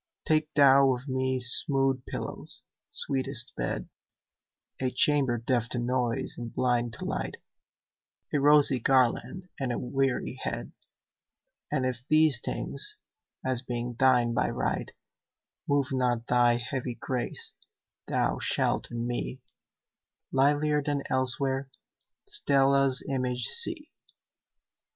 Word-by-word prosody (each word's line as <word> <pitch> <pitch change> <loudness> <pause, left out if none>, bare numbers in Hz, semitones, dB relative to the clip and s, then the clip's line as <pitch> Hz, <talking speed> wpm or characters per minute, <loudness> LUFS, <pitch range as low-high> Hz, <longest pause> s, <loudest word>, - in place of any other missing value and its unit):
Take 155 0 +1
thou 135 -2 +6
of 125 +3 -10
me 130 0 -1
smooth 135 +1 +1
pillows, - - 0 0.3
sweetest 135 -3 0
bed,A 130 - -7
chamber 130 -1 +2
deaf 120 0 -1
to - - -3
noise 120 -1 -1
and 120 -1 -6
blind 120 -2 0
to - - -6
light,A - - -7
rosy 145 -2 +5
garland 135 +9 +1
and 130 -3 -2
a - - -2
weary 135 +1 -2
head:And 135 -3 -8
if 125 -2 -2
these 155 -4 +4
things, - - +1 0.5
as 130 -2 0
being 120 -1 -4
thine 120 -1 +3
by - - +1
right, - - -2 0.8
Move 140 -1 +1
not 125 -3 0
thy 120 -1 +3
heavy 125 0 -4
grace, 125 0 -4 0.5
thou - - 0
shalt - - -1
in 120 0 -4
me, 125 +1 -4 0.9
Livelier 145 +2 +2
than 145 -1 -2
elsewhere, 130 +1 0 0.6
Stella's 140 - +2
image 125 -2 -2
see. 335 -9 +4
130 Hz, 110 wpm, -28 LUFS, 120-140 Hz, 0.9 s, thou